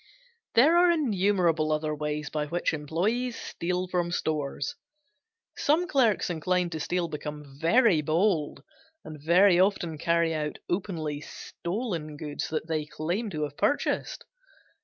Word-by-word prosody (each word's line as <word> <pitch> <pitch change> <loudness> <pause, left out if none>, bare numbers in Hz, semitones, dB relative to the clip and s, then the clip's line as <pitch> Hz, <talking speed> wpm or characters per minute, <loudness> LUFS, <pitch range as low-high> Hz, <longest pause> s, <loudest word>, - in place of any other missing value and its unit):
There 300 +9 +6
are 355 0 +6
innumerable 190 - +2
other 155 0 0
ways 150 0 -3
by 150 -1 -2
which 170 +2 -1
employes 195 - -1
steal 180 -1 -3
from 175 -1 -1
stores. 150 -4 -2 0.8
Some 315 +5 +2
clerks 255 - +2
inclined 180 +1 0
to 160 - -4
steal 175 +3 -1
become 150 -2 -7
very 190 - +4
bold 160 0 0 0.4
and 155 -2 -9
very 175 +3 +5
often 175 -5 +1
carry 170 0 +2
out 150 -1 -3
openly 160 -6 -2
stolen 170 -3 -5
goods 145 -1 -4
that 155 0 -3
they 155 -2 -2
claim 175 +10 -2
to 155 -5 -3
have 145 -1 -4
purchased. 290 - 0
170 Hz, 135 wpm, -27 LUFS, 150-195 Hz, 0.8 s, There